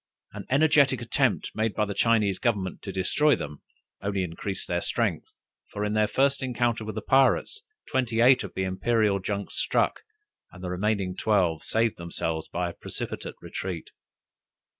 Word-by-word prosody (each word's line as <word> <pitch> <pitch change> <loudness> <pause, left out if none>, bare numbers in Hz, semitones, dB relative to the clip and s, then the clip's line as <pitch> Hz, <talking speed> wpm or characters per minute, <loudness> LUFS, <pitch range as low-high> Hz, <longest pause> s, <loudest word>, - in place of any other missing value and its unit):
An - - -7
energetic 140 -2 +4
attempt 120 +1 0
made 110 -1 -1
by 105 - +2
the 100 - -4
Chinese 105 -4 +2
government 100 -7 -1
to 100 - -6
destroy 135 +11 +2
them, 75 -1 -7 0.4
only 100 -1 -1
increased 90 +3 -4
their 85 0 0
strength; - - -1 0.3
for 105 0 -3
in 105 - -1
their 110 0 +3
first 140 +5 +2
encounter 120 -3 0
with 110 -1 -6
the 110 - -4
pirates, 135 - +3 0.3
twenty 125 -4 0
eight 125 +2 +6
of - - -8
the 95 - -1
Imperial 100 +2 +1
junks 100 +1 -4
struck, - - +1 0.5
and 95 -1 -12
the 90 - -3
remaining 95 0 -1
twelve 90 -8 +1
saved 110 -2 +1
themselves, 80 -2 -3
by 90 0 -2
a - - -14
precipitate - - -6
retreat. 90 -4 -5
105 Hz, 160 wpm, -27 LUFS, 95-120 Hz, 0.5 s, eight